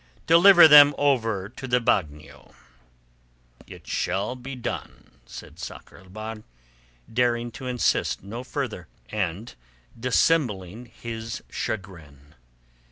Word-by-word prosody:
Deliver 170 +1 +8
them 145 -1 +8
over 115 -9 0
to 130 +4 -9
the 125 0 +2
bagnio." 80 -10 -3 1.1
"It - - -13
shall 100 +7 -2
be 130 +2 -8
done," 125 - -7 0.2
said - - -12
Sakr - - -10
el 95 - -18
Bahr, 110 +3 -7 0.8
daring 120 0 0
to 130 - -9
insist 125 -6 0
no 115 +5 -7
further 125 - -5 0.2
and 105 +2 -4 0.5
dissembling 120 - 0
his 115 -1 -7
chagrin. 80 -8 -7
115 Hz, 105 wpm, -24 LUFS, 95-130 Hz, 1.1 s, Deliver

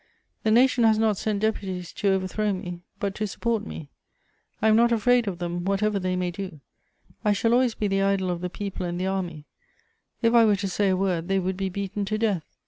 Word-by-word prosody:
The 220 - 0
nation 245 +2 +4
has 220 -1 +5
not 220 -1 +2
sent 210 0 -1
deputies 190 -5 -2
to 200 - 0
overthrow 195 +2 0
me, 175 -2 -6 0.2
but 200 -1 -1
to 215 +1 -2
support 225 +1 -2
me. 145 -3 -8 0.7
I - - +2
am 215 - +5
not 235 +1 +4
afraid 235 +1 +3
of 185 -3 -2
them, 175 0 -3
whatever 200 +2 +1
they 185 -1 -1
may 180 -1 -1
do; 185 -4 -7 0.6
I 210 - +3
shall 230 +3 +1
always 245 -2 +3
be 210 - -1
the 195 0 +1
idol 195 -2 +1
of 175 -1 -4
the 180 - -2
people 195 0 -5
and 175 0 -3
the 185 - -1
army: 180 -6 -3 0.8
if 230 0 +4
I 235 -1 +7
were 210 -2 +4
to 200 0 -3
say 195 +1 +1
a 185 - +2
word, 180 -3 0
they 195 0 +1
would 190 0 -1
be 190 0 -2
beaten 200 +2 -3
to 215 +2 -1
death. 205 -8 -2
195 Hz, 225 wpm, -25 LUFS, 185-215 Hz, 0.8 s, I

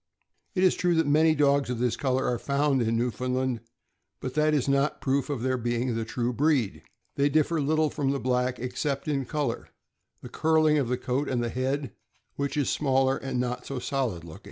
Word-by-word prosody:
It 185 - +2
is 185 - +5
true 175 -1 +1
that 165 0 +3
many 155 +2 +4
dogs 140 -2 +3
of 125 - -2
this 120 -1 0
color 130 0 0
are 120 -2 0
found 140 -1 +1
in 115 0 +1
Newfoundland, 125 +1 -1 0.6
but 130 - -5
that 155 +1 +2
is 140 - 0
not 140 +1 +1
proof 135 +2 0
of 135 -5 -3
their 130 -1 0
being 120 +1 -1
of - - -2
the 115 -1 -2
true 120 +2 -2
breed. 140 -6 +1 0.4
They 140 +1 +3
differ 155 +2 +2
little 155 +1 +1
from 140 -3 -1
the 140 0 0
black, 125 0 0
except 140 +3 -3
in 140 -3 0
color, 140 -4 -3 0.5
the - - -6
curling 155 -1 +3
of 135 - 0
the 125 +1 0
coat, 130 +3 -2
and 120 -2 0
the 120 - -1
head, 135 +2 -2 0.4
which 140 0 -2
is 145 - +1
smaller, 135 -2 +2
and 135 -2 -3
not 125 0 -3
so 135 - -4
solid 125 -9 -2
looking. 80 -2 -10
135 Hz, 205 wpm, -27 LUFS, 125-145 Hz, 0.6 s, is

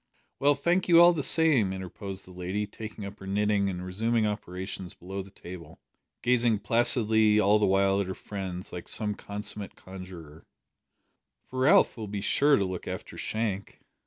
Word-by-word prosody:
"Well, 145 +1 +4
thank 170 +6 +1
you 170 -2 +7
all 175 +1 +8
the 160 - -2
same," 140 - +3
interposed 95 +1 -6
the 95 - -14
lady, 90 +3 -3
taking 105 0 -8
up 100 +1 -9
her 95 - -9
knitting 100 0 +1
and 90 -1 -5
resuming 110 +4 0
operations 95 -2 -5
below 95 +2 -6
the 95 - -12
table, 85 -4 -11 0.4
gazing 120 -3 +2
placidly 110 -1 +3
all 105 +1 +4
the 105 - +3
while 95 +1 +3
at 100 - -3
her 95 - -4
friends 95 -3 -6
like 90 - -7
some 105 -1 -1
consummate 105 0 -6
conjuror, 90 -5 -11 1.0
"for 130 - -6
Ralph 155 +6 +5
will 110 -2 -5
be 100 0 -4
sure 145 +7 +4
to 100 - +1
look 95 -1 -5
after - - -6
Shank." 110 -3 -3
100 Hz, 170 wpm, -28 LUFS, 95-115 Hz, 1.0 s, all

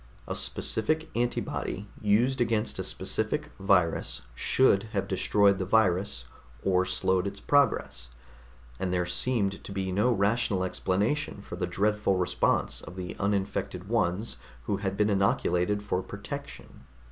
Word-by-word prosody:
A - - -2
specific 155 +9 0
antibody 120 -3 -2
used 120 +5 +2
against 115 -2 0
a - - -1
specific - - -1
virus 85 -10 +2
should 100 - +3
have 100 - -1
destroyed 100 +1 +3
the 95 - -1
virus 95 - +2 0.4
or 95 -1 +2
slowed 95 0 +1
its 100 0 -6
progress, 100 - +1 0.7
and 95 - -1
there 90 -1 +1
seemed 100 +2 0
to - - -8
be 95 -1 -2
no 105 +7 +2
rational 105 -2 +1
explanation 100 +6 -1
for - - -7
the 90 0 -2
dreadful 105 +1 +1
response 90 -1 +1
of 90 - -10
the 90 -1 -5
uninfected 95 -2 -2
ones 110 -2 0 0.3
who 100 - -1
had 100 -1 -3
been 105 0 +2
inoculated 100 0 +1
for 95 -3 -1
protection. 120 - -8
100 Hz, 135 wpm, -28 LUFS, 90-110 Hz, 0.7 s, should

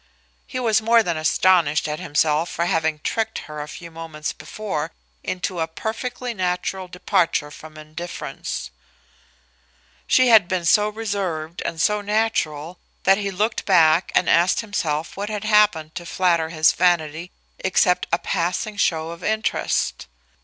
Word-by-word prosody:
He 255 - -4
was 220 -3 +2
more 230 +1 +4
than 170 -4 -1
astonished 155 -1 +3
at 150 0 -3
himself 155 -1 +1
for 170 - -1
having 160 -4 0
tricked 220 -1 -1
her 150 -1 -7
a 150 - -6
few 170 +2 -10
moments 160 -2 -5
before 200 -8 -5 0.3
into 185 -1 -3
a 160 - 0
perfectly 245 +7 -4
natural 185 -1 -2
departure 180 -4 0
from 155 +1 -12
indifference. 155 - -6 1.4
She 255 -1 +4
had 220 -6 +7
been 185 -2 -2
so 210 +4 +4
reserved 195 -7 -3
and 165 - -3
so 210 +4 +2
natural 185 -7 -1 0.2
that 195 +1 +4
he 200 -1 -2
looked 210 +4 -1
back 165 -2 +4
and 180 - +3
asked 175 +2 +3
himself 165 -8 -2
what 205 +2 -4
had 210 -1 -4
happened 210 -8 +3
to 175 - -7
flatter 170 -3 +1
his 160 -1 +4
vanity 170 -1 +1 0.3
except 180 -1 +2
a 170 - +3
passing 185 +4 -2
show 160 -4 0
of 170 +1 -10
interest. 220 - -1
180 Hz, 145 wpm, -22 LUFS, 160-210 Hz, 1.4 s, had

